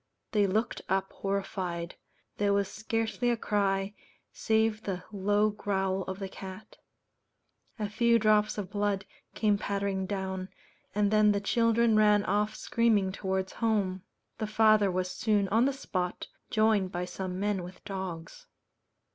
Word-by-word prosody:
They 205 -2 +3
looked 215 +5 -1
up 195 0 0
horrified; 190 -3 -3 0.4
there 205 -1 +2
was 200 -1 +2
scarcely 225 +3 -1
a 240 - +1
cry, 200 -2 0 0.4
save 220 -1 +1
the 185 -4 -4
low 205 +1 +2
growl 195 -2 -1
of 190 0 -5
the 195 -1 -4
cat; 190 +3 -10 1.0
a 210 -2 -2
few 235 +3 +3
drops 215 -1 +3
of 200 -3 -4
blood 205 -2 0 0.3
came 210 -2 +2
pattering 200 -2 -1
down, 190 -1 -3 0.5
and 205 -1 +2
then 215 -1 +5
the 200 - 0
children 230 +2 +3
ran 210 -1 +5
off 210 +2 0
screaming 215 -5 +2
towards 190 -1 -2
home. 200 -5 0 0.4
The 215 - -1
father 215 -2 +4
was 185 0 -1
soon 205 +1 +1
on 225 +5 +4
the 275 - +2
spot, 185 -9 -3 0.2
joined 215 -4 +2
by 175 +1 -2
some 180 +1 -5
men 205 -1 0
with 180 +3 -11
dogs. 190 - -6
205 Hz, 145 wpm, -29 LUFS, 190-215 Hz, 1.0 s, then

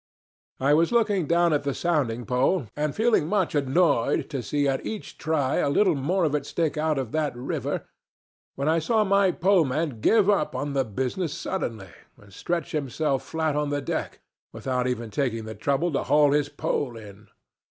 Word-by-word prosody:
"I 140 +2 +3
was 165 +6 +3
looking 210 -8 +2
down 170 0 +3
at 145 - +2
the 140 -1 -2
sounding 130 -9 0
pole, 130 - +1
and 150 -1 -2
feeling 220 -8 +2
much 195 -2 0
annoyed 145 -1 +1
to 135 -4 -2
see 145 +4 0
at 135 -1 -1
each 220 -2 -7
try 145 -4 0
a - - +1
little 185 +5 +3
more 165 +7 0
of 150 -3 +1
it 150 -2 0
stick 160 -3 -1
out 155 -1 0
of 130 -4 -3
that 150 -5 -1
river, 125 +3 -3 0.7
when 140 +2 -2
I 160 +1 +3
saw 215 +7 +2
my 200 -1 +3
poleman 160 - +1
give 215 - +4
up 200 -7 +2
the 140 -2 -1
business 130 - -3
suddenly, 115 - -4 0.3
and 100 -1 -18
stretch 170 - -3
himself 140 -1 -1
flat 155 +2 -2
on 150 -1 0
the 145 0 -1
deck, 135 - -4 0.3
without 125 -1 -2
even 120 -3 -3
taking 115 -3 -1
the 110 - -6
trouble 140 +10 0
to 140 - 0
haul 145 -1 +4
his 145 0 +1
pole 140 -3 -2
in. 105 -1 -13
145 Hz, 180 wpm, -25 LUFS, 130-170 Hz, 0.7 s, give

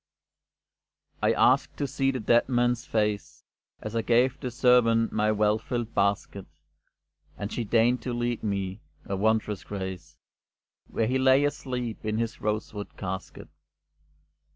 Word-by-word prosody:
I - - +3
asked 135 +2 +3
to 145 - -1
see 135 0 0
the 130 -1 -1
dead 120 +3 +3
man's 120 -1 +1
face, 105 -2 -1 0.4
As 110 +1 -5
I 115 - +2
gave 125 +3 +2
the 130 - -3
servant 120 -2 +3
my 110 0 +1
well 105 0 +2
filled 120 0 -4
basket; 100 -1 -1 0.9
And 100 +1 -5
she 120 - -2
deigned 120 +3 +2
to 125 - -4
lead 120 -1 -2
me, 100 -1 -3 0.2
a 100 - -3
wondrous 105 0 0
grace, 95 -2 -6 0.7
Where 115 - -1
he 130 +3 0
lay 130 +1 +5
asleep 125 -5 -3
in 110 0 -1
his 115 0 -3
rosewood 105 0 -3
casket. 95 -1 -6
115 Hz, 140 wpm, -27 LUFS, 105-125 Hz, 0.9 s, lay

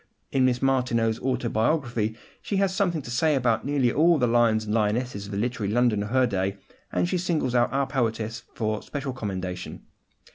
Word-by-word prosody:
In 130 -1 +3
Miss 125 0 +1
Martineau's 120 -4 +1
autobiography 120 -2 0 0.3
she 205 - -3
has 195 -1 +1
something 175 -6 0
to 120 - -7
say 150 +5 +2
about 120 -4 +1
nearly 140 -4 +2
all 165 +5 +4
the 125 - +2
lions 115 -2 +3
and 105 - -2
lionesses 105 -1 0
of - - -9
the 100 - -3
literary 110 -2 -1
London 120 -2 +2
of 105 - -4
her 130 +1 +3
day, 95 -2 -1 0.3
and - - +1
she 180 0 0
singles 160 -8 0
out 120 -1 +3
our 135 +1 +1
poetess 115 -3 -2
for 110 -2 -1
special 140 -2 -5
commendation. 95 -6 -5
120 Hz, 185 wpm, -26 LUFS, 110-135 Hz, 0.3 s, all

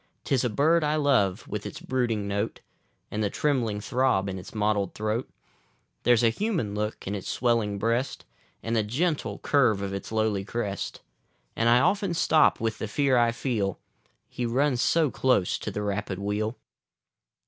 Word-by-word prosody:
'Tis 135 -2 +1
a 125 - +1
bird 155 +8 +3
I 150 0 +1
love, 135 -11 +2
with - - -4
its - - -7
brooding 115 -6 -1
note, 100 +2 -2 0.5
And 105 +1 -1
the 100 - +1
trembling 120 -6 0
throb 125 -3 +1
in 95 0 -4
its 95 - -10
mottled 105 -2 0
throat; 110 +3 -2 0.7
There's 120 -1 +4
a 115 - +6
human 170 - -1
look 105 +1 -3
in 100 - -3
its 100 -3 -5
swellinor 115 -4 +1
breast, 115 +6 -1 0.4
And 115 +1 -1
the 110 - +3
gentle 145 +10 -1
curve 120 -9 +2
of 100 0 -3
its 100 - -6
lowly 110 -3 0
crest; 100 -2 -4 0.5
And 115 +1 +2
I 120 +1 +6
often 195 0 +1
stop 155 -1 +4
with 110 -1 -2
the 110 - -3
fear 135 +4 +2
I 120 -1 +4
feel 110 -6 -2 0.3
— - - -40
He 125 - -5
runs 125 +2 +1
so 160 -1 +3
close 125 -9 +1
to - - -4
the 105 - -4
rapid 100 -1 -2
wheel. 105 +4 -2
115 Hz, 175 wpm, -27 LUFS, 105-130 Hz, 0.7 s, a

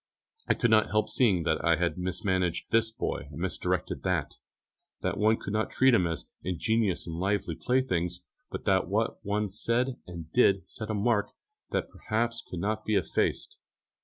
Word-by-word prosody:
I - - +3
could 120 - +1
not 110 -1 +5
help 110 0 +1
seeing 100 -9 +3
that 80 -1 0
I 85 - +4
had 85 +1 0
mismanaged 90 -1 -1
this 115 0 +3
boy 110 - -3
and 75 +1 -9
misdirected 95 +1 -1
that; - - -1 0.7
that - - -1
one 110 +1 +4
could 100 - -6
not 110 +1 0
treat 130 0 +4
them 90 -8 +4
as 80 0 -4
ingenuous 100 +2 0
and 85 -1 -5
lively 95 -1 0
playthings, 90 -9 0 0.3
but - - -6
that 95 -2 +3
what 110 +5 -1
one 105 +1 0
said 115 +6 0
and 85 -2 -9
did 100 -6 +4
set 110 -1 -6
a 110 - 0
mark 105 0 +2 0.4
which - - 0
perhaps 115 +1 -2
could 90 - -7
not 110 +1 -1
be 110 - 0
effaced. 90 -5 0
100 Hz, 175 wpm, -29 LUFS, 90-110 Hz, 0.7 s, not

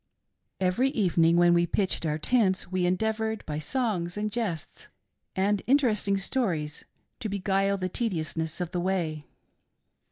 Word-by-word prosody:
Every 190 +8 +2
evening, 170 -7 +3
when 175 0 +5
we 170 0 +3
pitched 185 -2 0
our 150 0 0
tents, 190 +1 +1
we 185 -1 +1
endeavored 220 +3 -1
by 150 -1 -3
songs, 190 - -1
and 210 0 -2
jests, 200 -9 -4 0.5
and 200 +1 +1
interesting 225 -7 +3
stories, 185 - -2 0.3
to 220 - -3
beguile 195 0 +1
the 185 -1 -2
tediousness 165 -6 -2
of 175 -1 -3
the 180 - -1
way. 170 -5 -2
190 Hz, 135 wpm, -27 LUFS, 170-215 Hz, 0.5 s, when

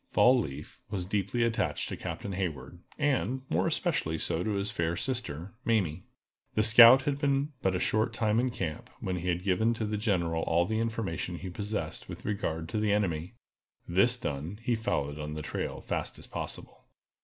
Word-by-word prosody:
Fall 125 +1 +5
leaf 75 - -6
was 95 -4 -2
deeply 100 +4 0
attached 115 -1 0
to - - -3
Captain 100 - -5
Hayward, 90 -2 -4 0.2
and, 135 -3 0
more - - +2
especially 80 +1 0
so 80 +2 0
to 110 - -1
his 100 +1 -1
fair 85 -4 -1
sister, 115 - -3
Mamie. 95 -7 0 0.5
The 110 - +3
scout 115 +4 +9
had 140 0 -1
been 140 +1 +1
but 95 -1 +1
a - - 0
short 110 +4 +1
time 110 -1 +1
in 130 +1 +2
camp, 85 -10 -4
when 95 -1 -2
he 90 +1 -4
had 90 0 0
given 110 +5 +2
to 110 - -2
the 105 0 -2
General 85 -6 0
all 85 +2 +2
the 110 +4 -1
information 110 -6 -2
he 95 - -6
possessed 100 -4 -4
with - - -8
regard 80 -6 -2
to 110 - -1
the 105 -1 +1
enemy. 90 -2 0 0.5
This 100 +8 +3
done, 75 - -4
he 120 - +1
followed 75 -10 -1
on 75 0 -4
the 75 - -5
trail - - -4
fast - - -3
as - - -8
possible. - - -6
100 Hz, 190 wpm, -30 LUFS, 85-115 Hz, 0.5 s, scout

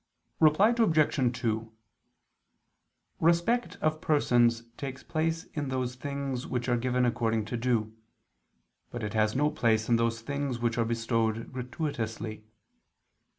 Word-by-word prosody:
Reply 160 +9 +5
Obj. 155 - +2
2: 110 0 -1 1.5
Respect 170 +9 +2
of 155 0 0
persons 120 -6 +3
takes 135 -2 -6
place 160 0 -1
in 145 -3 -3
those 130 -1 -2
things 135 -1 -4
which 125 -1 -2
are 120 - +3
given 125 +1 +1
according 115 -2 0
to 115 - -4
due; 115 -2 0 0.9
but 120 -1 -6
it 105 - -3
has 110 0 +2
no 150 +3 +2
place 110 -5 +1
in 120 - +5
those 115 0 0
things 140 0 -2
which 120 0 -1
are 115 - +2
bestowed 115 0 -1
gratuitously. 115 -5 -4
125 Hz, 130 wpm, -29 LUFS, 115-145 Hz, 1.5 s, Reply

